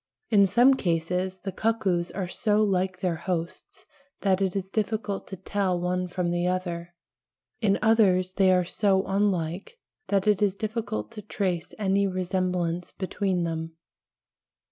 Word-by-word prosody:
In 200 -2 +6
some 245 +7 +5
cases 180 -2 -1
the 195 - -4
cuckoos 190 -5 0
are 190 -2 -4
so 210 +3 +1
like 185 -2 0
their 175 -3 0
hosts 170 0 -5 0.4
that 195 -1 +2
it 190 -1 0
is 190 -1 -3
difficult 215 -2 -2
to 190 - -6
tell 190 -1 -1
one 180 +1 -1
from 175 -1 -2
the 175 +1 0
other, 175 -1 -3 0.7
in 200 -3 +3
others 195 -5 +4
they 190 -1 +4
are 180 -1 +3
so 190 +1 +1
unlike 195 - -1 0.3
that 195 -2 +1
it 210 -1 +3
is 200 -2 +2
difficult 215 - -3
to 210 - -8
trace 185 -4 -2
any 200 -1 +2
resemblance 180 -2 -1
between 190 -2 -1
them. 165 -1 -3
185 Hz, 145 wpm, -26 LUFS, 180-200 Hz, 0.7 s, In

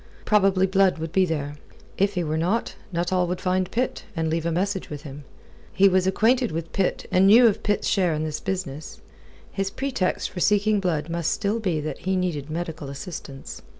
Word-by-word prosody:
Probably 195 -3 +4
Blood 190 -1 +3
would 160 0 -5
be 190 +1 +3
there. 145 -2 -3 0.4
If 200 +1 +1
he 180 - 0
were 155 -1 -2
not, 180 +8 0 0.2
Nuttall 180 +1 0
would 180 +1 -2
find 185 0 0
Pitt, 250 +2 -2
and 160 -1 -1
leave 165 0 -1
a - - 0
message 190 +3 -1
with 150 -1 -7
him. 145 -1 -9 0.5
He 195 +1 +5
was 185 -1 +3
acquainted 235 +5 +2
with 165 +1 -5
Pitt 195 -2 0
and 190 +1 +5
knew 230 +5 +8
of 220 -2 +3
Pitt's 205 -1 0
share 180 -5 +2
in 155 - -2
this 155 -1 -3
business. 170 -6 -5 0.5
His 195 -1 -2
pretext 250 -6 -2
for 180 - -6
seeking 210 +2 +3
Blood 165 -5 -1
must 170 -1 -1
still 210 +2 0
be 180 -8 0
that 155 - -5
he 190 +1 -1
needed 165 -6 -2
medical 160 -3 -4
assistance. 140 -1 -8
180 Hz, 195 wpm, -24 LUFS, 160-195 Hz, 0.5 s, knew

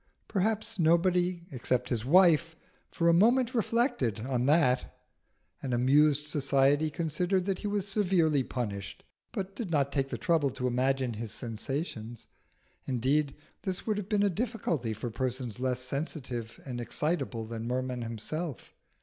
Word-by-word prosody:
Perhaps 215 +1 -1
nobody, 175 +1 +2
except 125 -1 -1
his 115 -4 -1
wife, 165 +2 +5 0.3
for 170 - 0
a 170 - +6
moment 240 +7 +4
reflected 230 - +1
on 125 0 -1
that. 140 -5 +3 0.7
An 130 - -3
amused 145 +4 +4
society 145 +1 +2
considered 175 +4 0
that 195 -2 -1
he - - -3
was 205 -1 -1
severely 180 -8 +2
punished, 105 -7 -5 0.3
but 195 0 -4
did 225 -7 -4
not 140 -4 +1
take 135 -1 0
the 120 - -3
trouble 145 +4 +2
to 125 0 -4
imagine 130 0 +1
his 110 0 -5
sensations; 115 0 -5 0.6
indeed 135 +3 +1 0.3
this 190 -3 -3
would 215 -2 0
have 205 -1 -7
been 205 -1 +2
a 205 - +4
difficulty 180 - -2
for 115 +3 -5
persons 125 -1 -3
less 125 -1 0
sensitive 130 -4 -4
and 125 -3 -4
excitable 125 -4 -2
than 115 0 -5
Merman 125 0 -2
himself. 120 - -5
140 Hz, 145 wpm, -30 LUFS, 125-180 Hz, 0.7 s, a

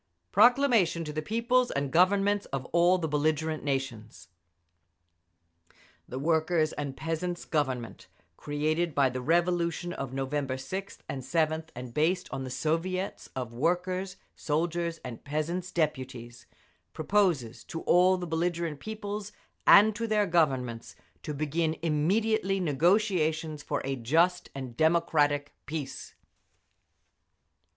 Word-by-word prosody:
PROCLAMATION 240 -10 +4
TO 150 -1 -6
THE 155 - -2
PEOPLES 235 +7 +1
AND 140 -1 -2
GOVERNMENTS 200 +4 +3
OF 135 -1 -4
ALL 175 +2 +5
THE 165 -3 -2
BELLIGERENT 155 +1 0
NATIONS. 135 -6 -4 1.8
The 130 - -5
Workers' 160 +2 +1
and 140 -2 -5
Peasants' 170 +2 -3
Government, 130 -6 -2 0.3
created 155 +2 -1
by 135 -2 +3
the 130 0 -4
revolution 170 +2 +1
of 135 -6 -5
November 135 0 -2
6th 190 +10 -6
and 135 - -4
7th 160 +3 0
and 125 -1 -7
based 180 +6 +1
on 135 -1 -4
the 130 - -5
Soviets 165 +8 -2
of 125 -3 -4
Workers', 180 +7 -1 0.2
Soldiers' 170 +2 -1
and 120 -3 -7
Peasants' 165 +5 -3
Deputies, 130 -7 -3 0.5
proposes 160 - +1
to 165 - -6
all 185 +1 +4
the 180 - -4
belligerent 165 -2 -2
peoples 210 0 -5 0.4
and 210 +1 +8
to 230 +2 -2
their 210 -1 +2
Governments 130 -9 0 0.3
to - - -5
begin 155 +2 -1
immediately 195 +6 +1
negotiations 160 -2 +1
for - - -3
a 135 0 -1
just 165 +9 +1
and 130 -3 -6
democratic 155 -3 +2
peace. 150 -3 -6
160 Hz, 120 wpm, -29 LUFS, 140-180 Hz, 1.8 s, and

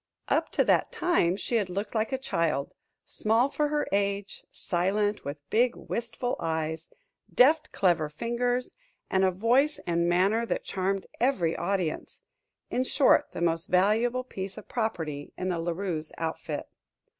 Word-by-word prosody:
Up - - +2
to - - +3
that - - +2
time 260 - +2
she 235 - 0
had 200 -4 -1
looked 200 +3 -4
like 220 +1 0
a 265 - 0
child, 165 - -1 0.3
small 225 +5 +1
for 300 +1 0
her 295 0 -1
age, 200 0 -1
silent, 205 +4 -1
with 145 0 -7
big, 240 +2 +3
wistful 240 +1 -3
eyes, 160 0 -2 0.4
deft, 305 +4 +4
clever 170 -5 +2
fingers, 240 +8 -1 0.4
and 190 0 +3
a 190 - +5
voice 240 +10 +2
and 170 0 +1
manner 195 +6 +3
that 235 - -2
charmed 195 0 -1
every 200 -11 +2
audience 180 -3 -2 0.5
in 255 - +1
short, 265 +1 +4
the - - -5
most 165 -1 +2
valuable 225 +7 +2
piece 195 -6 -6
of - - -10
property 160 - -3
in 185 - -2
La 170 -1 -1
Rue's 165 -3 -3
outfit. 160 -1 -3
195 Hz, 150 wpm, -28 LUFS, 170-240 Hz, 0.5 s, a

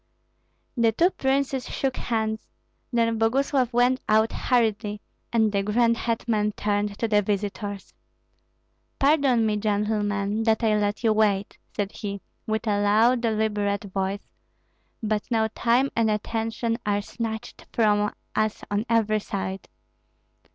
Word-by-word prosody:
The 230 -2 +3
two 345 - +3
princes 265 -2 -1
shook 270 -2 -1
hands; 220 -2 -2 0.4
then 230 -2 +1
Boguslav 255 +2 +2
went 245 +2 +3
out 220 +1 +4
hurriedly, 220 -4 0 0.3
and 220 -2 +3
the 200 -1 +1
grand 230 +3 +2
hetman 225 -2 -1
turned 205 0 -1
to 230 - 0
the 210 -1 +3
visitors. 205 0 -3 1.0
"Pardon 275 -5 +3
me, 210 -1 +1
gentlemen, 210 0 0
that 225 +1 +2
I 215 -1 +3
let 205 +2 -1
you 220 -1 +4
wait," 205 -2 +1 0.2
said 205 -2 -2
he, 200 -2 -5 0.3
with 220 +1 -1
a 205 -2 +1
low, 220 +5 +4
deliberate 215 -3 0
voice; 195 +1 -3 0.7
"but 215 -1 0
now 220 -2 +1
time 250 +4 +2
and 225 -1 +2
attention 225 +2 -1
are 205 0 0
snatched 225 +1 -6
from 210 -2 +2 0.2
us 215 0 0
on 205 +3 -1
every 220 -2 +2
side. 195 -2 -5
220 Hz, 130 wpm, -25 LUFS, 205-230 Hz, 1.0 s, out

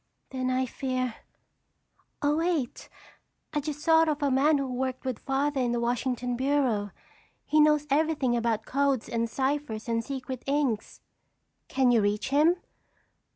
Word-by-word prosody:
"Then 255 -1 -2
I 255 0 +1
fear—oh, 255 +3 -5
wait! 325 -7 -1 0.6
I 295 - +1
just 295 0 -5
thought 325 0 +5
of 300 -1 -1
a 280 - +2
man 290 +4 +4
who 275 - -1
worked 255 +1 -3
with 255 -4 -2
Father 275 +1 0
in 240 -1 0
the 240 - 0
Washington 245 +1 -1
bureau. 255 -6 +1 0.6
He 305 - +2
knows 300 -1 +4
everything 290 -4 +2
about 230 -2 0
codes 275 -3 0
and 230 0 -1
ciphers 265 -4 -2
and 230 0 0
secret 260 -2 -5
inks." 275 -6 -1 0.7
"Can 260 -2 +2
you 235 -2 +4
reach 205 +4 0
him?" 300 +5 +4
265 Hz, 145 wpm, -28 LUFS, 240-290 Hz, 0.7 s, thought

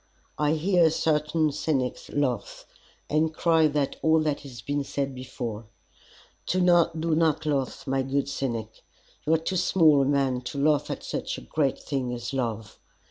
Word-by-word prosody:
I 150 0 +2
hear 170 +1 +3
certain 155 0 +1
cynics 135 -3 -2
laugh, 130 -7 -2 0.4
and 155 +1 +1
cry 160 0 +3
that 145 -2 -1
all 160 0 +4
that 150 -2 0
has 125 -7 -11
been 145 +3 -1
said 140 0 -3
before. 120 -4 -6 0.8
Do 185 - +1
not 170 -2 +3 0.4
laugh, 140 -3 -2
my 135 -1 0
good 135 +1 -1
cynic. 115 -5 -4 0.5
You 160 - +5
are - - +3
too 175 +4 -2
small 160 -5 +4
a - - +2
man 135 -2 +1
to 140 - -5
laugh 150 +1 +2
at - - -4
such - - -4
a - - -8
great 145 -4 0
thing 130 -3 -3
as 120 +2 -6
love. 115 -5 -3
145 Hz, 160 wpm, -26 LUFS, 130-160 Hz, 0.8 s, You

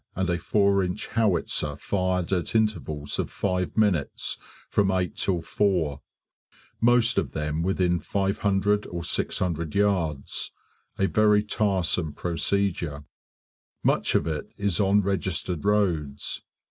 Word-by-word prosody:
and 95 -1 0
a 85 - 0
4 100 0 +2
inch 90 +3 -4
howitzer 90 -8 +1
fired 90 -1 -1
at 90 +3 -1
intervals 80 -10 0
of - - -1
five 90 0 -2
minutes 100 -10 +1 0.3
from 100 -2 +2
8 90 -2 0
till 90 -4 -1
4; 80 -8 0 0.8
most 120 -1 +4
of 95 - -4
them 75 +1 -2
within 90 -1 +1
500 100 +1 0
or 85 -1 -5
600 85 -2 -1
yards 90 -9 0 0.4
a 95 - +2
very 105 0 +4
tiresome 95 -7 0
procedure; 85 -4 -1 0.8
much - - +2
of - - +3
it 80 -2 -3
is 100 -5 0
on 100 +1 +4
registered 95 -3 -2
roads. 85 -9 0
95 Hz, 120 wpm, -26 LUFS, 85-100 Hz, 0.8 s, most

